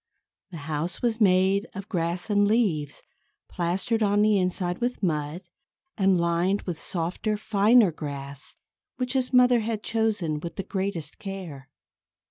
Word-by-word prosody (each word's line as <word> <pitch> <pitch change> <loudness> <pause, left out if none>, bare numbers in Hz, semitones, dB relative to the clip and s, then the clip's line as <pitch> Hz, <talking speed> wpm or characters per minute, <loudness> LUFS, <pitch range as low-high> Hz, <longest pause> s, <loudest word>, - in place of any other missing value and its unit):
The 175 - -8
house 160 +6 -3
was 230 -1 0
made 190 +2 +3
of 195 +1 -6
grass 175 +3 -2
and 205 0 +4
leaves, 185 - 0 0.4
plastered 185 +6 -1
on 205 0 +3
the 210 -2 +4
inside 180 0 -1
with 245 -3 -2
mud, 155 +1 -1 0.5
and 190 -3 +3
lined 170 +4 +1
with 170 -4 -5
softer, 185 +5 -2
finer 210 0 +4
grass, 140 -3 -7 0.4
which 250 0 -2
his 260 -2 0
mother 250 -1 +5
had 220 -1 -3
chosen 210 -9 0
with 170 +2 -7
the 195 - -4
greatest 190 -7 -4
care. 175 -9 -7
190 Hz, 140 wpm, -26 LUFS, 170-215 Hz, 0.5 s, mother